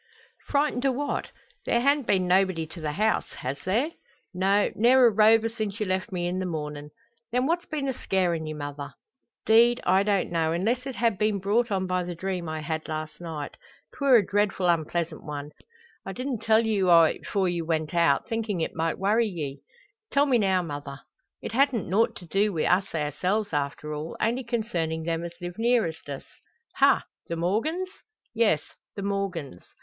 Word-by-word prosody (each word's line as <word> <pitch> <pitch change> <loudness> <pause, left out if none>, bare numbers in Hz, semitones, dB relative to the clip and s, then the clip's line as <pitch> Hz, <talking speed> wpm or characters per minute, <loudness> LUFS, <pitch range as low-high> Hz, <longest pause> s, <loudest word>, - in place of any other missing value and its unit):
"Frightened 285 -3 +1
o' 270 - +3
what? 285 +3 -2 0.4
There 235 - +3
han't 280 +1 +2
been 185 -2 +2
nobody 185 -3 +2
to 160 +2 -11
the 150 -1 -2
house 215 +6 0
has 135 +2 -5
there?" 235 - +1 0.4
"No; 195 +3 +2
ne'er 250 +3 +5
a 235 - +6
rover 220 +2 +5
since 215 -2 -4
you 215 - 0
left 185 0 -2
me 175 -2 -2
in 180 +1 -1
the 185 - -2
mornin'." 150 -3 -5 0.4
"Then 250 +2 +1
what's 345 +4 0
been 290 -3 -3
a 265 - 0
scarin' 175 -7 -1
ye, 155 - -4
mother?" 145 -2 -6 0.5
"'Deed, 235 +2 +5
I 190 +1 +4
don't 200 -3 0
know, 165 -1 +1
unless 235 +9 0
it 265 - -5
ha' 230 -3 +1
been 210 +1 +1
brought 210 +5 +1
on 190 -2 0
by 185 0 0
the 175 0 -5
dream 180 -1 -3
I 155 0 -4
had 160 0 -4
last 155 +1 -5
night. 160 -4 -6 0.4
'Twer' 275 -3 +4
a 215 -5 +5
dreadful 200 -2 0
unpleasant 170 -1 0
one. 145 0 -6 0.5
I - - -6
didn't 255 -2 -3
tell 225 +1 +3
you 200 -4 +1
o' 170 -1 +8
it 160 - -1
'fore 195 -2 +1
ye 175 -1 -1
went 160 -1 -2
out, 165 -5 +3
thinkin' 225 -5 -2
it 160 - -2
might 165 0 -1
worry 215 +4 +2
ye." 150 -8 -5 0.5
"Tell 280 +1 +4
me 255 -4 +3
now, 190 -3 +2
mother." 145 -3 -7 0.4
"It - - -4
hadn't 255 -3 +2
nought 225 +5 +2
to 185 - -10
do 200 +5 +1
wi' 165 -5 -1
us 180 0 +1
ourselves, 180 +7 -1
after 145 +1 -2
all. 150 +2 -5
Only 240 +4 0
concernin' 195 -9 -2
them 165 0 -2
as 170 0 -6
live 175 +2 -7
nearest 225 -11 +1
us." 140 -1 -6 0.5
"Ha! - - +4 0.2
the 170 - -3
Morgans?" 230 - -1 0.4
"Yes; 215 -10 +2 0.3
the 200 - -5
Morgans." 190 - -3
190 Hz, 190 wpm, -26 LUFS, 165-225 Hz, 0.5 s, o